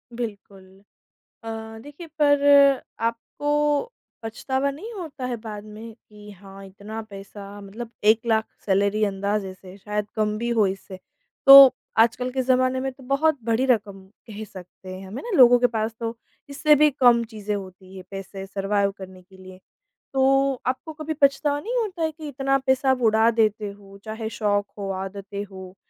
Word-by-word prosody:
बिल्कुल। 205 -4 -7 0.8
अ, 225 - -6 0.3
देखिए 290 +6 -11
पर 285 -2 +5 0.2
आपको 290 - -1 0.3
पछतावा 265 +5 -2
नहीं 345 +12 -9
होता 315 - -7
है 250 -1 -2
बाद 215 -2 -8
में 220 +2 -10
कि 210 -2 -16
हाँ, 195 0 -13
इतना 205 +3 -8
पैसा 200 -1 -11
मतलब 225 +4 -9
1 215 +2 +4
लाख 220 -1 +1 0.2
सैलरी 200 +2 +1
अंदाज़े 200 0 -2
से, 185 0 -14
शायद 210 +1 -4
कम 215 -1 0
भी 235 +2 -3
हो 225 -3 +3
इससे। 190 0 -7 0.5
तो 275 -1 +11 0.2
आजकल 235 +3 +3
के 260 +1 -1
ज़माने 255 0 +1
में 265 +1 -3
तो 265 - -17
बहुत 285 +4 +1
बड़ी 230 +3 +1
रकम 205 -6 0 0.3
कह 215 0 -7
सकते 185 -1 -13
हैं 190 +1 -10
हम। 210 +7 -7 0.2
लोगों 245 -4 +7
के 245 - +4
पास 225 -1 -3
तो 230 0 -4 0.3
इससे 300 +2 +3
भी 300 +1 +5
कम 245 -4 +4
चीज़ें 215 -2 -5
होती 190 -1 -10
हैं 185 - -9
पैसे 195 0 -7
सर्वाइव 200 +1 -1
करने 190 -1 -11
के 190 +1 -20
लिए। 185 0 -13 0.5
तो 270 +1 +3
आपको 265 +5 -3
कभी 310 0 -5
पछतावा 285 0 +2
नहीं 470 +10 -3
होता 405 -7 -3
है 320 - 0
कि 310 0 -10
इतना 270 -1 0
पैसा 265 0 +3
आप 255 -1 -1
उड़ा 220 0 +4
देते 215 -2 0
हो, 200 -1 -15
चाहे 220 0 -5
शौक 205 -2 -1
हो, 200 -1 -5
आदतें 195 +1 -6
हो। 190 -1 -11
220 Hz, 170 wpm, -23 LUFS, 200-270 Hz, 0.8 s, तो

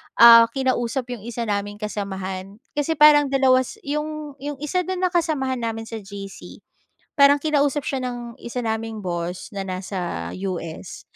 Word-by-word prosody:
Ah, 230 0 +9
kinausap 255 -1 -1
'yong 230 -2 -7
isa 235 0 -3
naming 205 -1 -2
kasamahan. 195 -2 -5 0.2
Kasi 295 +2 -1
parang 295 -1 +7
dalawa 260 -2 +3
si - - -12
'yong 300 0 -4
'yong 285 +1 -6
isa 300 +5 0
do'n 370 0 -2
na 365 - +2
kasamahan 300 -7 0
namin 225 -1 -3
sa 225 0 -7
GC, 195 -1 -10 0.5
parang 285 0 +6
kinausap 290 -2 +1
siya 275 - -3
ng 240 -2 -5
isa 235 +1 -5
naming 225 -1 -3
boss 175 -1 -4
na 200 -3 -5
nasa 185 -1 -4
US 185 -2 -6
235 Hz, 155 wpm, -23 LUFS, 200-285 Hz, 0.5 s, Ah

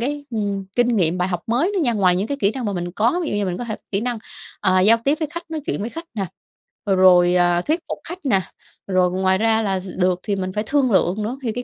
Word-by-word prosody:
cái, 285 +4 -2
ừm, 200 -3 -2
kinh 245 0 +3
nghiệm, 175 -1 +1
bài 180 - 0
học 175 -2 -2
mới 265 - +2
nữa 395 - -1
nha, 240 - +2
ngoài 185 -5 +3
những 195 +3 -1
cái 280 +4 -2
kỹ 200 - +3
năng 260 -2 -4
mà 205 - -1
mình 175 -1 -4
có, 235 - +1
ví - - -3
dụ 205 - -1
như 205 - 0
mình 180 -1 -3
có 245 - -4
thể 220 -2 -4 0.2
kỹ 195 - +1
năng, 240 0 -2 0.4
ờ, 185 0 +3
giao 220 +5 +6
tiếp 280 - +3
với 310 - -1
khách, 340 0 -8
nói 315 -1 -3
chuyện - - -2
với 225 - -3
khách 330 +5 -7
nè, 200 -3 -2 0.6
rồi, 180 -2 +5
ờ, 175 -1 +3
thuyết 315 - 0
phục - - -4
khách 360 +1 -6
nè, 200 -8 +3 0.5
rồi 185 -2 +2
ngoài 190 0 +2
ra 225 +1 +2
là 195 -3 0
gi 185 +1 -9
được 180 -1 +1
thì 205 -2 -1
mình 185 -1 -3
phải 210 - -1
thương 280 -4 +2
lượng 195 +1 +2
nữa, 245 +5 -3
thì 230 - -1
cái 245 +3 -4
205 Hz, 285 wpm, -21 LUFS, 185-245 Hz, 0.6 s, giao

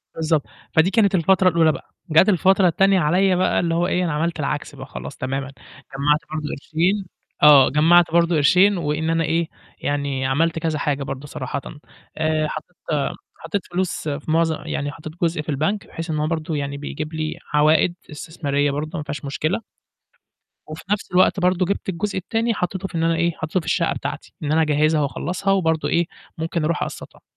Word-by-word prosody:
بالضبط، 160 -2 +1 0.3
فدي 160 +4 +4
كانت 200 -3 +3
الفترة 185 +2 +4
الأولى 165 -2 +3
بقى، - - -9 0.2
جات 160 +6 +5
الفترة 190 0 +4
التانية 190 +3 +3
عليّا 180 +4 +3
بقى 185 - +2
اللي 165 -1 0
هو 175 +1 +1
إيه، 180 0 0
أنا 165 -3 -1
عملت 165 +2 -1
العكس 145 0 -3
بقى 130 -1 -8
خلاص - - -8
تمامًا، 135 0 -3 0.5
جمّعت 150 +2 +3
برضه 155 -1 -3
قرشين 180 +8 0 0.4
آه، 145 -3 +8
جمّعت 165 +4 +5
برضه 170 0 +3
قرشين 185 +7 +4
وإن 155 0 -1
أنا 165 0 +1
إيه، 165 +1 0 0.3
يعني 140 -2 -2
عملت 165 +5 +1
كذا 160 -2 -1
حاجة 145 -1 -1
برضه 135 +1 -6
صراحةً، 130 0 -4 0.6
آآ 155 0 +1
حطّيت 155 +4 -7 0.6
حطّيت 200 - -4
فلوس 180 -2 -2
في 150 +2 -4
مُعظم 165 0 +2
يعني 145 0 -3
حطّيت 155 +1 -9
جزء 170 -2 +1
في 150 - -10
البنك 160 +9 -1
بحيث 165 +1 -7
إن 155 - -1
هو 150 - 0
برضه 160 -1 -2
يعني 140 -1 -3
بيجيب 150 +2 -6
لي 155 -1 -3 0.2
عوائِد 155 +3 +4 0.2
استثمارية 145 -2 -1
برضه 155 +5 -4
ما 150 - -3
فيهاش 145 0 -6
مشكلة. 155 +8 -1 1.1
وفي 155 +1 -8
نَفْس 205 -2 -1
الوقت 185 +2 +4
برضه 180 0 +2
جبت 195 +1 -2
الجزء 195 +3 -2
التاني 225 +5 0
حطّيته 190 -1 -3
في 175 - -11
إن 165 - 0
أنا 165 0 +2
إيه، 170 +1 +1
حطّيته 160 +3 -2
في 160 - -9
الشَقّة - - +1
بتاعتي، - - -6
إن 145 - -1
أنا 160 +1 +3
أجهّزها 155 0 +2
وأخلّصها 180 +7 -1
وبرضه 160 -5 +1
إيه، 170 +1 +2 0.3
ممكن 165 0 -2
أروح 170 +1 0
أقسّطها، - - -8
160 Hz, 185 wpm, -22 LUFS, 150-180 Hz, 1.1 s, آه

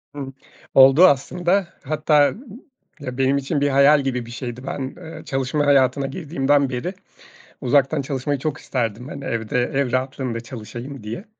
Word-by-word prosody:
Hıı, 135 -2 -6 0.4
oldu 135 +6 +8
aslında 175 +6 +2 0.2
hatta, 150 0 +3
ımm, 230 - -11
benim 135 +1 +2
için 140 +1 -2
bir 145 - +2
hayal 140 +2 +5
gibi 125 -3 -2
bir 115 - -11
şeydi. 125 +2 -7
Ben, 135 -1 -4
eee, 165 -2 -10
çalışma 135 +2 -1
hayatına 140 -1 +3
girdiğimden 140 -2 0
beri 130 +9 -4 0.7
uzaktan 140 +3 +2
çalışmayı 135 +1 -2
çok 155 +2 -3
isterdim. 120 -1 -3
Hani, 140 -1 -8
evde, 115 +1 -2
ev 135 -2 0
rahatlığında 130 -2 -2
çalışayım 120 +2 -8
diye 115 - -6
135 Hz, 145 wpm, -21 LUFS, 130-145 Hz, 0.7 s, oldu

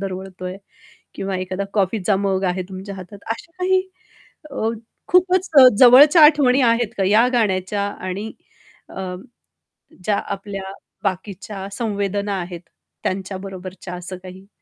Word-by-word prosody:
दरवळतोय 185 -1 -6 0.6
किंवा 195 -1 -3
एखादा 185 +1 -3
कॉफीचा 200 0 +1
मग 195 -1 0
आहे 185 0 0
तुमच्या 195 +1 -7
हातात. 185 +2 -10
अशा 280 +9 -11
काही 370 +1 +2 0.7
अ, 225 -5 -2 0.4
खूपच 365 +1 +3 0.3
जवळच्या 280 +6 +8
आठवणी 280 -3 +5
आहेत 230 -1 +2
का 195 - +2
या 215 +5 +5
गाण्याच्या? 200 -3 0
आणि 200 +2 -5 0.6
अ, 185 -1 -6 0.9
ज्या 205 0 +1 0.2
आपल्या 195 -1 -7 0.3
बाकीच्या 195 +1 -4
संवेदना 200 -2 -2
आहेत, 175 -1 -7 0.4
त्यांच्या 190 +1 -3
बरोबरच्या 185 -1 -8
असं 180 +1 -7
काही? 185 +1 -11
195 Hz, 120 wpm, -21 LUFS, 185-225 Hz, 0.9 s, जवळच्या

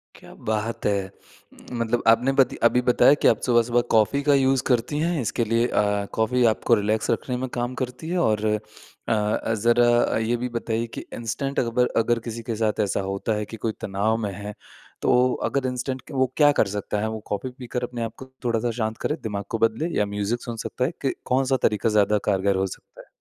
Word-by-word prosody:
क्या - - -14
बात 110 +1 -2
है! 100 -2 0 0.6
मतलब 120 0 -1
आपने 125 +4 +5
बति 135 - +4
अभी 120 +1 +4
बताया 125 +2 +6
कि - - +5
आप 110 - +4
सुबह-सुबह 120 0 +3
कॉफ़ी 115 +6 +3
का 145 -1 +4
यूज़ 135 -1 +3
करतीं 130 +4 +1
हैं। 165 -3 0
इसके 120 +1 -1
लिए 115 +2 +2
अ, 105 -2 +1
कॉफ़ी 125 +3 +1
आपको 115 +1 +2
रिलैक्स 105 +1 0
रखने 125 -1 -2
में 130 +1 -3
काम 120 +1 -2
करती 125 +5 -5
है 180 - -1
और 110 -7 +1
अ, 105 +1 -2
ज़रा 120 +2 +3
ये 115 +2 0
भी 125 +1 -3
बताइए 115 0 -2
कि - - -6
इंस्टेंट 125 +4 -3
अबर 125 0 +1
अगर 120 +1 +1
किसी 115 0 -5
के 115 - 0
साथ 110 -1 0
ऐसा 100 -2 +1
होता 100 +3 -2
है 105 0 -2
कि 115 +2 -9
कोई 110 - -2
तनाव 105 +3 0
में - - -4
है 105 +2 -7 0.5
तो 125 0 +3 0.2
अगर 135 -2 -1
इंस्टेंट 130 +1 -3
क - - -9
वो 130 -2 +1
क्या 145 -1 +6
कर 125 - +2
सकता 105 +1 -3
है? 110 - 0
वो 110 0 -4
कॉफ़ी 105 +6 -3
पीकर 125 -1 -5
अपने 120 -1 -4
आप 115 -1 -4
को 130 - -9 0.2
थोड़ा-सा 120 -1 0
शांत 110 -1 -3
करें, 150 - -1
दिमाग 100 -2 -3
को 115 - -1
बदले 115 +8 +1
या 105 - +3
म्यूज़िक 105 +3 -2
सुन 120 - -5
सकता 125 +3 -2
है? 150 - -1
क 135 - +3
कौन-सा 130 +1 +2
तरीका 105 +1 0
ज़्यादा 105 -1 +3
कारगर 100 0 +2
हो 95 0 +1
सकता - - -12
है? - - -19
115 Hz, 210 wpm, -24 LUFS, 105-125 Hz, 0.6 s, बताया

